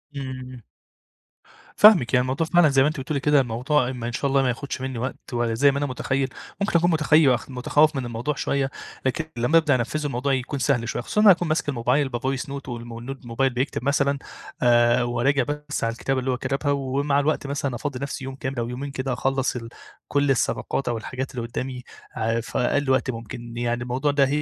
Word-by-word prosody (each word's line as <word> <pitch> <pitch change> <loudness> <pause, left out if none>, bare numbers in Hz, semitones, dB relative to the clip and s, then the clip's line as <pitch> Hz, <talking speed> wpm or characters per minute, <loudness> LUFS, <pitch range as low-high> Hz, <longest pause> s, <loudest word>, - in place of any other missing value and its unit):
امم. 130 -3 -7 1.1
فاهمِك، 195 - +7
يعني 125 - +5
الموضوع 135 +6 -1
فعلًا 175 -2 +5
زي 135 -1 +4
ما 135 - +4
أنتِ 155 -1 -2
بتقولي 140 +2 -2
كده 145 0 +4
الموضوع 130 +2 0
م 125 -3 -7
إن 120 - -2
شاء 125 - -3
الله 135 0 +3
ما 130 - +1
يخدش 130 +2 -4
مني 130 -2 -4
وقت، 130 +1 -6
ولا 120 -1 0
زي 140 +5 +4
ما 140 - -3
أنا 145 - 0
متخيل 130 0 -1 0.3
ممكن 200 -4 +2
أكون 175 +2 +2
متخي 155 -4 +4
خ - - -13
متخوف 145 +4 +2
من 130 -2 -2
الموضوع 120 +5 -3
شوية 140 -1 0 0.4
لكن 145 +5 0
لما 125 +8 +3
أبدأ 155 -4 +3
أنفذه 130 +5 -2
الموضوع 135 0 0
يكون 130 +2 -2
سهل 125 -4 +1
شوية، - - -2
خصوصًا 210 - 0
إن - - +4
أنا 205 - +10
هاكون 175 0 -3
ماسك 155 -1 0
الموبايل 135 +2 +1
بvoice 130 +2 -2
note 140 -1 -6
والم 120 -1 -6
والnote 135 +3 -7
الموبايل 125 +3 0
بيكتب 125 0 -2
مثلًا 140 +1 +2 0.5
آآ، 120 0 +4
وأراجع 120 +3 +1
بس 150 +2 -4
على 115 - +1
الكتابة 135 +3 -1
اللي 130 +1 -1
هو 125 - -1
كتبها 135 +3 -1
ومع 140 +1 0
الوقت 145 0 0
مثلًا 140 -2 -2
أفضِّي 135 +1 -4
نفسي 140 -1 -5
يوم 135 0 -6
كامل 130 -1 -4
أو 115 0 -2
يومين 135 +3 -5
كده 130 -1 -2
أخلص 135 +1 0
ال 115 -2 -6 0.4
كل 140 -1 +2
الصفقات 135 +1 -1
أو 120 -1 0
الحاجات 130 +3 -5
اللي 120 -2 -3
قدامي 125 +1 -5 0.3
ع 115 +1 0
في 115 - -5
أقل 140 +3 +1
وقت 130 0 +2
ممكن 120 0 -8
يعني 120 0 -1
الموضوع 130 +4 0
ده 140 -1 +3
130 Hz, 215 wpm, -24 LUFS, 120-140 Hz, 1.1 s, أنا